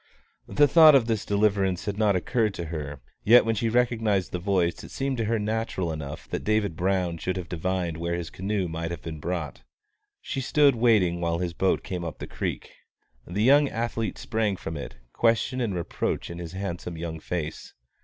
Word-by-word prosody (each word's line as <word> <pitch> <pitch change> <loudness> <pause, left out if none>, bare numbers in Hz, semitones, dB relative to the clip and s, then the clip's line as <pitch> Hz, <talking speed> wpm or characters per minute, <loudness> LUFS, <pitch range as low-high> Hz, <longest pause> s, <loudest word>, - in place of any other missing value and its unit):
The 145 0 +4
thought 155 -1 +8
of 130 -4 +5
this 110 -3 -1
deliverance 100 -3 +1
had 105 - -2
not 105 -2 +2
occurred 110 +3 0
to 85 - -4
her; 70 -3 -5 0.2
yet 120 +3 +7
when 115 - +1
she 115 +1 0
recognised 110 -5 +1
the 90 - -3
voice 90 -2 0
it - - -10
seemed 135 -1 -2
to 115 - 0
her 115 +2 +1
natural 105 -5 -2
enough 80 0 -6
that - - -3
David 110 -5 +1
Brown 90 -1 0
should 90 +4 -2
have 90 -2 -5
divined 90 -1 -2
where 85 +1 -2
his 85 -1 -5
canoe 95 0 -2
might 80 0 -4
have 85 -3 -6
been 80 -2 -6
brought. 80 -5 -4 0.6
She 135 - -4
stood 145 +1 +4
waiting 105 -8 +3
while 85 -1 0
his 85 -1 -2
boat 95 +3 +1
came 90 -2 -4
up 85 - -5
the - - -6
creek. - - -4 0.6
The 100 +5 -1
young 140 +3 +5
athlete 115 -1 -2
sprang 110 -3 -1
from 80 -3 -6
it, 70 - -7 0.2
question 120 +2 +1
and 105 -6 -1
reproach 85 0 -2
in 85 - -7
his 85 0 -7
handsome 90 -3 -5
young 80 -1 -5
face. 80 -1 -5
95 Hz, 195 wpm, -26 LUFS, 85-115 Hz, 0.6 s, thought